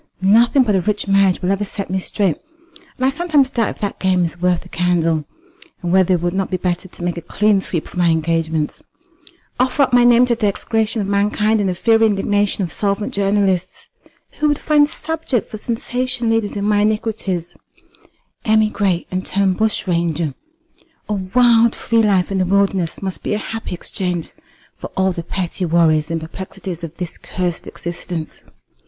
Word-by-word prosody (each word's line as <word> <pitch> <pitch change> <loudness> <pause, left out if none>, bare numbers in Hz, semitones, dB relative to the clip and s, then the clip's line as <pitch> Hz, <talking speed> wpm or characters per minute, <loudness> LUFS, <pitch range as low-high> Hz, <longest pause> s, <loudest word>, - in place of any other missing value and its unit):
Nothing 230 +7 +4
but 215 -4 +1
a 190 - +2
rich 205 +2 -1
marriage 195 -2 +3
will 180 - +1
ever 195 +1 0
set 200 -2 -5
me 190 - 0
straight; 190 -3 -1 0.6
and 255 - 0
I - - +4
sometimes 290 -3 +1
doubt 230 -4 +1
if - - -8
that 205 - -3
game 185 -1 +2
is 170 +1 -4
worth 180 -1 +2
the - - -14
candle, 165 -3 +1 0.6
and 175 0 -1
whether 190 -1 +4
it 170 - -2
would 175 0 0
not 195 0 -1
be 185 - -1
better 180 +1 -2
to 175 - -10
make 175 0 -2
a - - -4
clean 205 +4 +2
sweep 170 -4 -3
of - - -11
my 175 -1 +3
engagements, 160 -1 -1 0.8
offer 260 +3 +3
up 260 - -1
my 245 0 +6
name 240 0 +6
to 245 - +1
the 225 -2 0
execration 220 +2 -1
of - - -4
mankind 210 +2 +1
and 200 -2 +1
the 180 - -2
fiery 225 +4 +4
indignation 205 0 0
of 170 - -5
solvent 205 0 -1
journalists, 195 -2 0 0.5
who 305 - +2
would 295 -1 +2
find 295 -2 +3
subject 320 -9 -3
for 215 - -5
sensation 245 +1 -2
leaders 225 -2 0
in 200 0 -2
my 210 0 +3
iniquities, 205 -5 -1 0.9
emigrate, 215 -4 +2
and 185 0 -2
turn 195 -1 +1
bushranger. 170 -7 0 0.8
A - - 0
wild 230 +4 +3
free 230 0 +1
life 200 -4 +2
in 195 - 0
the 185 - +2
wilderness 195 -2 0
must 190 -1 -4
be - - -1
a - - 0
happy 225 -3 -5
exchange 180 -1 -3 0.4
for - - -7
all 190 0 +2
the 170 - -4
petty 180 +2 -4
worries 160 -3 +3
and 165 0 -1
perplexities 180 +1 -7
of 165 0 -7
this 175 -2 -6
cursed 180 -2 -4
existence." 170 -1 -6
195 Hz, 185 wpm, -19 LUFS, 175-220 Hz, 0.9 s, my